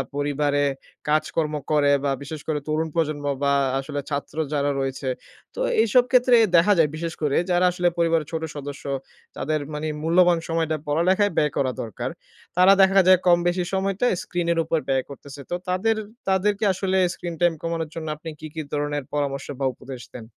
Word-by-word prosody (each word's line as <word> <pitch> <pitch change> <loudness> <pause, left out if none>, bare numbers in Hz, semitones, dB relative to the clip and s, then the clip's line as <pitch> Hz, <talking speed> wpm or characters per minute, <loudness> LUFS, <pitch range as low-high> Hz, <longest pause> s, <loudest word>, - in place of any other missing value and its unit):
পরিবারে 145 0 0 0.5
কাজকর্ম 155 0 0 0.2
করে 145 -1 +4
বা 140 - +1
বিশেষ 150 +1 -7
করে 150 -2 0
তরুণ 155 +1 0
প্রজন্ম 150 -3 -1 0.2
বা 140 0 +3 0.3
আসলে 145 +1 -4
ছাত্র 145 +2 -4 0.2
যারা 145 0 +1
রয়েছে। 135 0 -2 0.5
তো - - -7 0.2
এইসব 235 +3 +4
ক্ষেত্রে 250 -1 +5 0.2
দেখা 205 +5 +5
যায় 155 -3 +4
বিশেষ 165 +1 -4
করে 145 -2 +1
যারা 175 +1 +3
আসলে 175 0 0
পরিবারের 165 -3 +2
ছোট 160 0 -2
সদস্য 145 -1 -7 0.5
তাদের 155 +3 -1
মানে 150 +1 -3 0.2
মূল্যবান 175 +1 +4
সময়টা 160 -1 0
পড়ালেখায় 185 +7 +2
ব্যয় 150 -2 +3
করা 130 -2 +1
দরকার। 110 -4 -5 0.5
তারা 185 +2 +7
দেখা 195 0 +6
যায় 185 -1 +7
কম 175 -1 +7
বেশি 175 0 +1
সময়টা 195 +4 0 0.2
স্ক্রিন 175 -1 -3
এর 165 - -1
উপর 165 0 +1
ব্যয় 135 -1 +1
করতেছে। 140 0 -10
তো - - +1
তাদের 220 +5 +1 0.3
তাদেরকে 200 +3 +1
আসলে 190 0 -1 0.2
স্ক্রিন 170 -1 -6
টাইম 175 -1 +4
কমানোর 165 -2 -3
জন্য 160 -1 -5
আপনি 160 +1 -8
কি, 155 - -7
কি 160 - -4
ধরনের 145 -1 -1
পরামর্শ 140 -2 -2 0.2
বা 135 - +2
উপদেশ 130 -2 -9
দেন? 115 -3 -8
160 Hz, 175 wpm, -24 LUFS, 145-180 Hz, 0.5 s, তারা